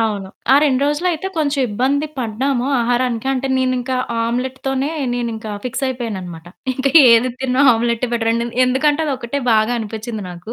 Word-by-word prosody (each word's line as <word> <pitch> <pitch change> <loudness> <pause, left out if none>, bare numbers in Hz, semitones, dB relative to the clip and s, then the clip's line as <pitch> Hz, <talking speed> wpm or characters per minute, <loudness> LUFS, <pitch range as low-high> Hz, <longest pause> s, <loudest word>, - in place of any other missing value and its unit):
అవును. 205 -4 -1 0.2
ఆ - - +7
2 270 -4 +2
రోజులు 295 +5 -1
అయితే 340 +2 -3
కొంచెం 290 -2 0
ఇబ్బంది 265 +8 0
పడ్డాము 250 +2 -1
ఆహారానికి, 245 0 0
అంటే 270 0 -2
నేనింక 255 0 -1 0.3
ఆమ్లెట్ 250 +3 -2
తోనే 270 +1 0 0.3
నేను 240 -1 -2
ఇంకా 220 -1 -7
ఫిక్స్ 250 +2 -2
అయిపోయాననమాట. 190 -10 -6 0.3
ఇంక 265 +2 -3 0.2
ఏది 230 +2 +4
తినను 260 0 0
ఆమ్లెటె 235 +1 0
బెటరండి 230 0 0
అని 235 - -9
ఎందుకంటే 290 +4 +1
అది 290 - 0
ఒకటే 255 +3 -4
బాగా 220 +2 +2
అనిపించింది 220 0 -5
నాకు. 180 +6 -9
245 Hz, 165 wpm, -18 LUFS, 225-265 Hz, 0.3 s, ఆ